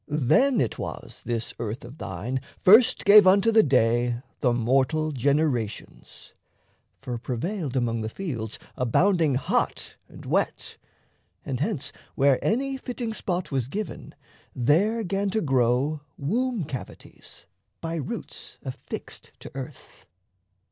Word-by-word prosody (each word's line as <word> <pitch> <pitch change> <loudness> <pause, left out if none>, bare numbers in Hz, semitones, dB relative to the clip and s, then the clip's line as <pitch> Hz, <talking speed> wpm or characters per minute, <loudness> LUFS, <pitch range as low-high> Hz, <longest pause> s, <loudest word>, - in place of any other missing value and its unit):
Then 155 - +3
it 115 - -1
was - - -7
This 115 -1 -2
earth 115 +1 -4
of 125 +6 -12
thine 115 +9 -4 0.2
first 220 +6 +6
gave 205 -1 +9
unto 200 +4 +5
the 220 0 +7
day 120 - +2 0.2
The 125 - +2
mortal 135 +6 +1
generations; 135 -5 -2 0.7
for 125 -3 -4
prevailed 140 - -3
Among 115 -3 0
the 110 - -3
fields 115 - -5 0.2
abounding 160 - +2
hot 130 - -1
and - - -12
wet. - - -1 0.7
And 135 -4 -3
hence, 155 -4 -1 0.2
where 135 -1 +3
any 270 +5 0
fitting 245 -3 -4
spot 180 -5 -3
was 130 -4 -1
given, 210 +9 -6 0.4
There 190 - +2
'gan 195 +1 -1
to 220 +3 0
grow 135 +2 +1 0.2
womb 230 - -1
cavities, 135 -3 -9 0.3
by 165 0 -3
roots 145 - -6
Affixed - - -7
to - - -9
earth. 135 +1 -10
140 Hz, 125 wpm, -26 LUFS, 125-195 Hz, 0.7 s, gave